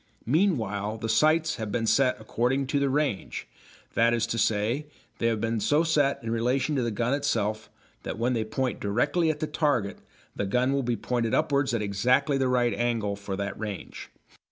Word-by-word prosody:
Meanwhile 110 Hz, -, 0 dB
the 115 Hz, -, -4 dB
sights 155 Hz, +7 st, +3 dB
have 110 Hz, -3 st, -4 dB
been 115 Hz, +1 st, -1 dB
set 130 Hz, +3 st, +3 dB
according 125 Hz, +5 st, 0 dB
to 140 Hz, -, +3 dB
the 140 Hz, -1 st, +1 dB
range 140 Hz, -7 st, -2 dB, 0.5 s
that 115 Hz, +1 st, +3 dB
is 115 Hz, -1 st, +1 dB
to 115 Hz, 0 st, -2 dB
say, 110 Hz, +8 st, 0 dB, 0.3 s
they 115 Hz, -, +1 dB
have 115 Hz, -2 st, 0 dB
been 115 Hz, +1 st, -1 dB
so 145 Hz, +9 st, +2 dB
set 150 Hz, -4 st, +2 dB
in 115 Hz, -, -3 dB
relation 130 Hz, +5 st, 0 dB
to 135 Hz, -, +1 dB
the 120 Hz, -, 0 dB
gun 115 Hz, +4 st, -1 dB
itself 110 Hz, -7 st, -1 dB, 0.3 s
that -, -, -5 dB
when 120 Hz, +3 st, +1 dB
they 115 Hz, -2 st, 0 dB
point 120 Hz, +3 st, -2 dB
directly 120 Hz, -, +1 dB
at 150 Hz, -1 st, -2 dB
the -, -, +1 dB
target 140 Hz, -11 st, 0 dB, 0.4 s
the 100 Hz, -, -2 dB
gun 125 Hz, +6 st, +1 dB
will 140 Hz, -, +1 dB
be 120 Hz, -2 st, -1 dB
pointed 120 Hz, -2 st, -1 dB
upwards 140 Hz, -1 st, +1 dB
at 110 Hz, -, -1 dB
exactly 125 Hz, +8 st, +2 dB
the 130 Hz, -, +2 dB
right 120 Hz, -2 st, +2 dB
angle 115 Hz, -4 st, -1 dB
for 100 Hz, -1 st, -5 dB
that 100 Hz, +1 st, -3 dB
range. 105 Hz, -5 st, -6 dB
120 Hz, 195 wpm, -27 LUFS, 110-140 Hz, 0.5 s, sights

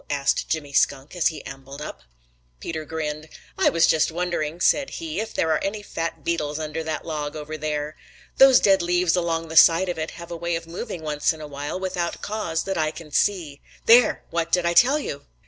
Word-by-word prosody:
asked 140 Hz, -1 st, 0 dB
Jimmy 145 Hz, -3 st, -3 dB
Skunk 140 Hz, +2 st, +1 dB
as 175 Hz, -, +2 dB
he 160 Hz, -, -4 dB
ambled 135 Hz, +1 st, -9 dB
up. 150 Hz, -, -7 dB, 0.6 s
Peter 160 Hz, -2 st, -5 dB
grinned. 155 Hz, 0 st, -4 dB, 0.3 s
"I -, -, +3 dB
was 165 Hz, -1 st, +3 dB
just 160 Hz, 0 st, +2 dB
wondering," 170 Hz, -2 st, -2 dB
said 275 Hz, +9 st, +2 dB
he, 325 Hz, -2 st, -4 dB
"if 220 Hz, 0 st, -3 dB
there 160 Hz, -, 0 dB
are 155 Hz, -, +1 dB
any 205 Hz, +1 st, -3 dB
fat 165 Hz, -4 st, -4 dB
beetles 150 Hz, -3 st, -1 dB
under 160 Hz, +1 st, -4 dB
that 155 Hz, -1 st, -4 dB
log 150 Hz, -2 st, -4 dB
over 155 Hz, 0 st, -6 dB
there. 150 Hz, 0 st, -3 dB, 0.4 s
Those 270 Hz, -1 st, +8 dB
dead 195 Hz, -1 st, +4 dB
leaves 175 Hz, 0 st, +2 dB
along 165 Hz, -2 st, -1 dB
the 160 Hz, -, -6 dB
side 170 Hz, +4 st, +7 dB
of 175 Hz, -, -3 dB
it 155 Hz, -, -2 dB
have 170 Hz, 0 st, -10 dB
a -, -, -3 dB
way 170 Hz, 0 st, -2 dB
of 165 Hz, 0 st, -5 dB
moving 175 Hz, +1 st, -6 dB
once 150 Hz, +1 st, 0 dB
in 160 Hz, -, -12 dB
a 155 Hz, -, -7 dB
while 145 Hz, +4 st, -5 dB
without 180 Hz, -2 st, -3 dB
cause 190 Hz, -7 st, -2 dB
that 195 Hz, -3 st, -2 dB
I 155 Hz, -1 st, +1 dB
can 155 Hz, -1 st, -10 dB
see. 160 Hz, -4 st, 0 dB, 0.2 s
There! 235 Hz, 0 st, +5 dB
What 170 Hz, 0 st, -1 dB
did 180 Hz, -1 st, +2 dB
I 170 Hz, -, +2 dB
tell 260 Hz, -, +5 dB
you?" 145 Hz, -, -6 dB
165 Hz, 215 wpm, -24 LUFS, 150-180 Hz, 0.6 s, Those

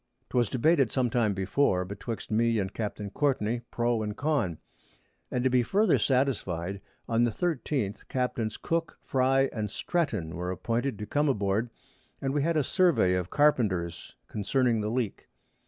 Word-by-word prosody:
'Twas 120 Hz, -3 st, +2 dB
debated 135 Hz, -1 st, +3 dB
some 125 Hz, -3 st, +1 dB
time 120 Hz, -4 st, +2 dB
before 95 Hz, -1 st, +1 dB
betwixt 100 Hz, +4 st, -6 dB
me 115 Hz, +1 st, +2 dB
and 95 Hz, -2 st, -2 dB
Capt. 110 Hz, -2 st, -4 dB
Courtney 120 Hz, -5 st, 0 dB
pro 120 Hz, -1 st, 0 dB
and 105 Hz, -1 st, -4 dB
con; 135 Hz, -, 0 dB, 0.7 s
and 125 Hz, -, -1 dB
to 130 Hz, -, +3 dB
be 125 Hz, -1 st, +4 dB
farther 195 Hz, -, +3 dB
satisfy'd, 100 Hz, -, 0 dB, 0.3 s
on 115 Hz, +1 st, +2 dB
the 120 Hz, -, +3 dB
13_th_ 135 Hz, -, -2 dB
Capts. 120 Hz, -4 st, -2 dB
Cook, 165 Hz, 0 st, -2 dB
Fry 135 Hz, 0 st, +2 dB
and 105 Hz, -2 st, -2 dB
Stretton 110 Hz, -, -2 dB
were 90 Hz, +2 st, -3 dB
appointed 115 Hz, +7 st, -1 dB
to 105 Hz, -, -5 dB
come 145 Hz, +6 st, +1 dB
aboard, 105 Hz, -1 st, 0 dB, 0.5 s
and 135 Hz, 0 st, -2 dB
we 145 Hz, -, +1 dB
had 165 Hz, +2 st, +1 dB
a 150 Hz, -, +3 dB
Survey 170 Hz, -, +3 dB
of 90 Hz, -1 st, -1 dB
Carpenters 100 Hz, -, +1 dB
concerning 115 Hz, +2 st, +1 dB
the 105 Hz, -, -1 dB
Leak. 115 Hz, -3 st, -2 dB
120 Hz, 155 wpm, -28 LUFS, 105-135 Hz, 0.7 s, be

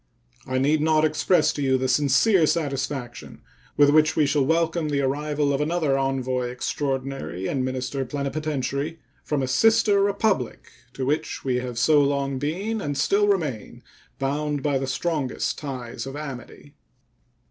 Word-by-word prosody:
I 130 Hz, 0 st, -1 dB
need 145 Hz, +4 st, +2 dB
not 155 Hz, 0 st, +3 dB
express 155 Hz, +2 st, +2 dB
to 145 Hz, -, -4 dB
you 130 Hz, -1 st, +2 dB
the 130 Hz, 0 st, -1 dB
sincere 155 Hz, -, +3 dB
satisfaction 135 Hz, -6 st, -3 dB, 0.3 s
with 145 Hz, -1 st, +6 dB
which 155 Hz, +1 st, +4 dB
we 155 Hz, -, +3 dB
shall 145 Hz, 0 st, +2 dB
welcome 165 Hz, +1 st, +1 dB
the 140 Hz, -1 st, 0 dB
arrival 145 Hz, +1 st, 0 dB
of 135 Hz, -, 0 dB
another 155 Hz, -2 st, +1 dB
envoy 130 Hz, -2 st, -1 dB
extraordinary 135 Hz, -5 st, -3 dB
and 130 Hz, +5 st, -1 dB
minister 130 Hz, +1 st, -2 dB
plenipotentiary 140 Hz, +2 st, -3 dB, 0.3 s
from 145 Hz, -3 st, -1 dB
a -, -, -1 dB
sister 205 Hz, -, +4 dB
Republic 200 Hz, -, 0 dB, 0.2 s
to 130 Hz, -, -3 dB
which 145 Hz, +1 st, -2 dB
we 130 Hz, -2 st, +1 dB
have 125 Hz, -1 st, -4 dB
so 145 Hz, +4 st, +4 dB
long 140 Hz, -1 st, 0 dB
been, 195 Hz, +10 st, -2 dB
and 145 Hz, -4 st, -3 dB
still 200 Hz, +9 st, +2 dB
remain, 155 Hz, -, -2 dB, 0.3 s
bound 145 Hz, +1 st, -2 dB
by 140 Hz, -2 st, +1 dB
the 135 Hz, -, -3 dB
strongest 140 Hz, 0 st, -2 dB
ties 130 Hz, -4 st, -6 dB
of 135 Hz, -, -7 dB
amity. 145 Hz, -1 st, -8 dB
145 Hz, 150 wpm, -24 LUFS, 135-155 Hz, 0.3 s, with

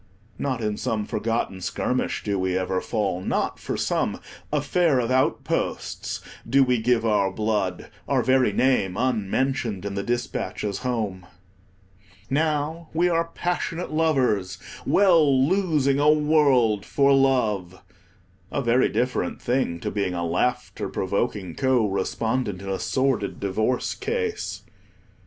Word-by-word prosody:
Not 130 Hz, -4 st, -2 dB
in 105 Hz, -1 st, -1 dB
some 105 Hz, -2 st, -2 dB
forgotten 110 Hz, -4 st, -2 dB
skirmish 125 Hz, +7 st, -1 dB
do 100 Hz, -2 st, -1 dB
we 95 Hz, 0 st, 0 dB
ever 95 Hz, 0 st, -1 dB
fall; 100 Hz, -5 st, -1 dB
not -, -, -1 dB
for -, -, -4 dB
some -, -, -1 dB, 0.3 s
"affair 150 Hz, +1 st, +2 dB
of 120 Hz, 0 st, -1 dB
outposts" 130 Hz, +1 st, -1 dB, 0.3 s
do 135 Hz, 0 st, +5 dB
we 125 Hz, -3 st, +1 dB
give 120 Hz, 0 st, +2 dB
our 105 Hz, -3 st, +2 dB
blood, 105 Hz, -3 st, -2 dB, 0.2 s
our -, -, +2 dB
very 130 Hz, -3 st, +3 dB
name 100 Hz, -5 st, +1 dB
unmentioned 115 Hz, -2 st, -1 dB
in 100 Hz, -, -3 dB
the 100 Hz, -, -2 dB
dispatches 105 Hz, -3 st, -3 dB
home. 110 Hz, -8 st, -3 dB, 1.0 s
Now 155 Hz, +2 st, 0 dB
we 175 Hz, +2 st, +3 dB
are 165 Hz, -1 st, +1 dB
passionate 175 Hz, -1 st, -2 dB
lovers, 130 Hz, -12 st, +1 dB, 0.3 s
well 155 Hz, -9 st, +4 dB
losing 155 Hz, -7 st, +2 dB
a 145 Hz, +1 st, +4 dB
world 145 Hz, -9 st, +3 dB
for 140 Hz, +3 st, +3 dB
love—a 95 Hz, -5 st, -2 dB
very 120 Hz, +2 st, +3 dB
different 125 Hz, +1 st, -1 dB
thing 120 Hz, -9 st, -1 dB
to -, -, -3 dB
being 100 Hz, -3 st, -1 dB
a 85 Hz, 0 st, -2 dB
laughter 125 Hz, +8 st, -1 dB
provoking 100 Hz, -2 st, -2 dB
co 130 Hz, -1 st, +2 dB
respondent 105 Hz, +1 st, -1 dB
in 100 Hz, -, -6 dB
a 95 Hz, -, -2 dB
sordid 130 Hz, -6 st, 0 dB
divorce 110 Hz, +5 st, 0 dB
case. 445 Hz, 0 st, -3 dB
120 Hz, 130 wpm, -24 LUFS, 100-140 Hz, 1.0 s, do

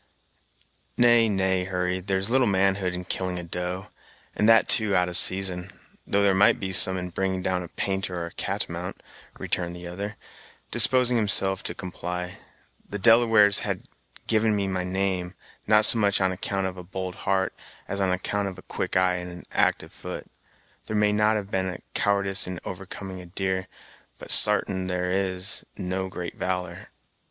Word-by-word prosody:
"Nay, 120 Hz, -2 st, +4 dB
nay, 95 Hz, -2 st, 0 dB
Hurry, 90 Hz, 0 st, -2 dB
there's 95 Hz, +1 st, 0 dB
little 125 Hz, +1 st, +2 dB
manhood 95 Hz, -2 st, +1 dB
in 90 Hz, 0 st, -6 dB
killing 90 Hz, 0 st, -3 dB
a 90 Hz, -, -5 dB
doe, 90 Hz, +2 st, -5 dB, 0.5 s
and 105 Hz, -, +2 dB
that 115 Hz, -1 st, +5 dB
too 110 Hz, -3 st, +6 dB
out 90 Hz, -1 st, +2 dB
of 90 Hz, -, -6 dB
season; 95 Hz, -1 st, +3 dB, 0.4 s
though 100 Hz, 0 st, +1 dB
there 100 Hz, -1 st, +3 dB
might 100 Hz, +2 st, +4 dB
be 95 Hz, -1 st, -4 dB
some 95 Hz, 0 st, +6 dB
in 90 Hz, 0 st, -5 dB
bringing 95 Hz, +1 st, -2 dB
down 95 Hz, -1 st, -1 dB
a 90 Hz, -, -7 dB
painter 95 Hz, 0 st, -3 dB
or 85 Hz, -, -4 dB
a 85 Hz, -, -9 dB
catamount," -, -, -4 dB, 0.3 s
returned 85 Hz, -1 st, -3 dB
the 90 Hz, 0 st, -10 dB
other, 100 Hz, +4 st, -6 dB, 0.6 s
disposing 125 Hz, +2 st, +5 dB
himself 95 Hz, -3 st, +3 dB
to -, -, -5 dB
comply. 90 Hz, 0 st, -6 dB, 0.5 s
"The 105 Hz, -, -4 dB
Delawares 115 Hz, -2 st, +5 dB
have -, -, -3 dB, 0.4 s
given 110 Hz, -1 st, +1 dB
me 100 Hz, -1 st, -1 dB
my 95 Hz, -1 st, -2 dB
name, 90 Hz, -1 st, -2 dB, 0.3 s
not 105 Hz, 0 st, +5 dB
so 115 Hz, -, +4 dB
much 100 Hz, -1 st, +2 dB
on 95 Hz, -1 st, +1 dB
account 95 Hz, +1 st, -3 dB
of 95 Hz, 0 st, -5 dB
a 90 Hz, -, -8 dB
bold 95 Hz, +1 st, -6 dB
heart, 95 Hz, 0 st, -1 dB, 0.3 s
as 100 Hz, 0 st, -2 dB
on 95 Hz, -, +1 dB
account 100 Hz, +2 st, -2 dB
of 95 Hz, -, -7 dB
a -, -, -13 dB
quick -, -, -3 dB
eye, 90 Hz, -1 st, +2 dB
and 90 Hz, 0 st, -7 dB
an 90 Hz, 0 st, -11 dB
actyve -, -, +1 dB
foot. -, -, -8 dB, 0.6 s
There 110 Hz, -, -3 dB
may 105 Hz, 0 st, +3 dB
not 105 Hz, -1 st, 0 dB
be -, -, -2 dB
any 95 Hz, -1 st, -4 dB
cowardyce 100 Hz, -2 st, 0 dB
in 90 Hz, -2 st, -5 dB
overcoming 95 Hz, -1 st, -7 dB
a 90 Hz, -, -12 dB
deer, 95 Hz, 0 st, -3 dB, 0.5 s
but -, -, -6 dB
sartain 95 Hz, -3 st, +6 dB
it 90 Hz, -, -2 dB
is, 95 Hz, +1 st, -2 dB
there's 90 Hz, -, -6 dB
no 95 Hz, 0 st, -3 dB
great 90 Hz, -2 st, -7 dB
valor." 90 Hz, -1 st, -4 dB
95 Hz, 180 wpm, -25 LUFS, 90-100 Hz, 0.6 s, too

